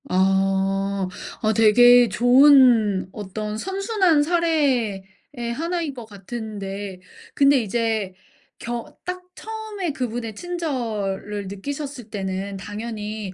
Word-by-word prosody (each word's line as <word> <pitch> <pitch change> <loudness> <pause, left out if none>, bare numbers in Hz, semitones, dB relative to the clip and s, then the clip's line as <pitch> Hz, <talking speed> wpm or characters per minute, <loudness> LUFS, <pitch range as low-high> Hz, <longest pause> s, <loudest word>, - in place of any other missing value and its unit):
아. 195 +1 +1 0.3
아 215 0 +2
되게 245 +3 +6
좋은 245 -3 +5
어떤 210 +1 -5
선순환 385 - +1
사례의 290 - +1 0.5
하나인 335 0 -2
것 240 -3 -9
같은데 200 -2 -7 0.3
근데 280 0 +5
이제 220 -3 -1 0.5
경 235 0 -4 0.2
딱 365 0 -4
처음에 435 -5 -5
그분의 235 -4 -4
친절을 220 - -3
느끼셨을 270 +4 -6
때는 195 -1 -4
당연히 210 0 -6
225 Hz, 205 characters per minute, -23 LUFS, 200-285 Hz, 0.5 s, 되게